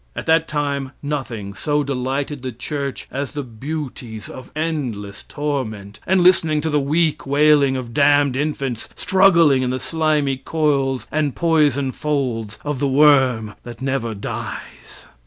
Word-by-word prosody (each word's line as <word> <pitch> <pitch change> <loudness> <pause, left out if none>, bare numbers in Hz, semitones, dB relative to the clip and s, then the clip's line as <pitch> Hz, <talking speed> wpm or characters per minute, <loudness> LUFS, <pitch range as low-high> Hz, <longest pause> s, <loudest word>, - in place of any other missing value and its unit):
At - - -5
that 160 0 +3
time 140 -2 -2
nothing 125 -9 -4
so 145 +7 0
delighted 135 +1 -2
the 130 0 -4
church 140 +3 -4
as 140 0 -4
the 145 -1 -3
beauties 125 -3 -6
of 130 -1 -10
endless 125 -11 -3
torment, 110 -9 -4
and 185 0 +3
listening 165 -4 +4
to 160 +1 -1
the 150 - +3
weak 150 +1 0
wailing 140 -1 +4
of 120 -2 -6
damned 145 -1 +4
infants 135 -4 -2
struggling 170 -8 +4
in 125 - 0
the 130 +1 -2
slimy 150 -4 0
coils 135 -2 0
and 150 -3 0
poison 150 -5 +2
folds 125 -8 -2
of 145 -3 -2
the 140 - +1
worm 130 -6 +4
that 120 -1 -10
never 130 -4 -2
dies. 100 - -7
140 Hz, 145 wpm, -20 LUFS, 125-150 Hz, -, listening